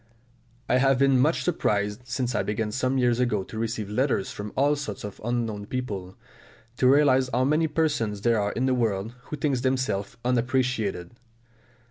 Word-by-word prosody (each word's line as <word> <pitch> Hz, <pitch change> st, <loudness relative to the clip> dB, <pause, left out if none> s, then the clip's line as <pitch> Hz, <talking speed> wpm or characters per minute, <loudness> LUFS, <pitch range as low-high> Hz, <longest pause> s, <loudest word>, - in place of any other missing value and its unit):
I -, -, +3 dB
have 135 Hz, 0 st, +3 dB
been 135 Hz, -1 st, +4 dB
much 150 Hz, +6 st, +2 dB
surprised, 105 Hz, -8 st, -1 dB
since 125 Hz, 0 st, -2 dB
I -, -, +1 dB
began 105 Hz, +1 st, -2 dB
some 130 Hz, +3 st, 0 dB
years 125 Hz, -2 st, +2 dB
ago 110 Hz, -6 st, +1 dB
to 110 Hz, +3 st, -8 dB
receive 110 Hz, -2 st, -2 dB
letters 115 Hz, -1 st, 0 dB
from 105 Hz, 0 st, -6 dB
all 145 Hz, +2 st, +3 dB
sorts 135 Hz, -9 st, -6 dB
of 105 Hz, -1 st, -8 dB
unknown 115 Hz, -3 st, -2 dB
people, 100 Hz, -8 st, -5 dB, 0.6 s
to 130 Hz, -, +3 dB
realise 130 Hz, -2 st, +4 dB
how 125 Hz, +2 st, +2 dB
many 155 Hz, +4 st, +2 dB
persons 130 Hz, -10 st, -1 dB
there 115 Hz, -1 st, +2 dB
are 100 Hz, 0 st, -1 dB
in 125 Hz, -, -1 dB
the 130 Hz, -, +2 dB
world 110 Hz, -3 st, -1 dB
who 150 Hz, -, -6 dB
think 140 Hz, -4 st, 0 dB
themselves 130 Hz, -5 st, -1 dB
unappreciated. 125 Hz, -7 st, 0 dB
125 Hz, 170 wpm, -26 LUFS, 105-130 Hz, 0.6 s, been